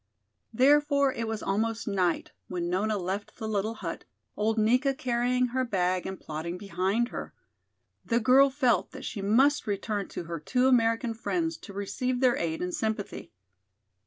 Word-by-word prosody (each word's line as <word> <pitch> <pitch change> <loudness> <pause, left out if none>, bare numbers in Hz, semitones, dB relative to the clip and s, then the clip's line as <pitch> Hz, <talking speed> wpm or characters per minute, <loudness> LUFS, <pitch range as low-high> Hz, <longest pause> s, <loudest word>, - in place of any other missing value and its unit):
Therefore 280 +2 +4
it 230 -1 -3
was 220 -1 -3
almost 225 +4 -1
night 185 -5 0 0.2
when 175 -2 -3
Nona 210 +3 +1
left 195 +2 -4
the 220 - -5
little 215 +1 -1
hut, 170 -6 -5 0.3
old 220 +2 0
Nika 250 +6 +3
carrying 250 -2 +1
her 260 +2 0
bag 185 -5 0
and 190 -1 -6
plodding 160 +3 -5
behind 195 +5 0
her. - - -7 0.7
The 235 0 +1
girl 260 +4 +6
felt 260 -3 +1
that - - -8
she 205 - -4
must 255 +8 +3
return 205 0 -2
to - - -6
her 170 0 -5
two 250 - +1
American 230 -1 +3
friends 325 +8 -1
to 200 - -11
receive 245 +6 -2
their 250 -2 +4
aid 165 0 -2
and 180 0 -3
sympathy. 220 - -3
220 Hz, 160 wpm, -28 LUFS, 195-250 Hz, 0.7 s, girl